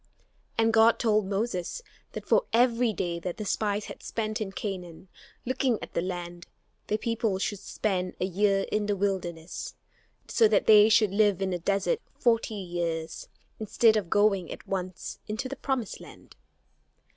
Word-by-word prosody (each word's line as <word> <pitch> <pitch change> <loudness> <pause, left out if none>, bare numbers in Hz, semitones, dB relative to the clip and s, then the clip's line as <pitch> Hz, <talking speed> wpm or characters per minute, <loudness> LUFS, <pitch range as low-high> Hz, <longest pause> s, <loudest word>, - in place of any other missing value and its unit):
And 225 0 +3
God 225 +1 +6
told 215 -3 +2
Moses 200 - -2 0.3
that - - -6
for - - +3
every 240 0 +3
day 175 -4 -3
that 175 +1 -5
the 215 - -5
spies 205 +1 -1
had - - -9
spent 215 -1 -3
in 200 -3 -3
Canaan, 190 -6 -6 0.4
looking 255 -1 +1
at - - -9
the - - 0
land 175 -1 -5 0.4
the 215 - +1
people 225 -3 -1
should 200 +1 -2
spend 185 -3 -2
a 180 - +1
year 195 +1 +1
in 210 -1 0
the 205 - +1
wilderness; 180 -4 -3 0.5
so 225 - +4
that 210 - +2
they 215 0 +8
should 215 -3 +4
live 205 -2 +3
in 190 -1 -1
the 175 - -2
desert 200 - 0 0.2
forty 230 -2 +1
years, 170 -4 -4 0.3
instead 220 +1 +3
of 200 -6 -1
going 195 -4 +2
at - - -9
once 185 -2 -4
into 220 +5 -3
the 275 - -5
promised 260 -5 -3
land. - - -14
205 Hz, 165 wpm, -28 LUFS, 185-225 Hz, 0.5 s, they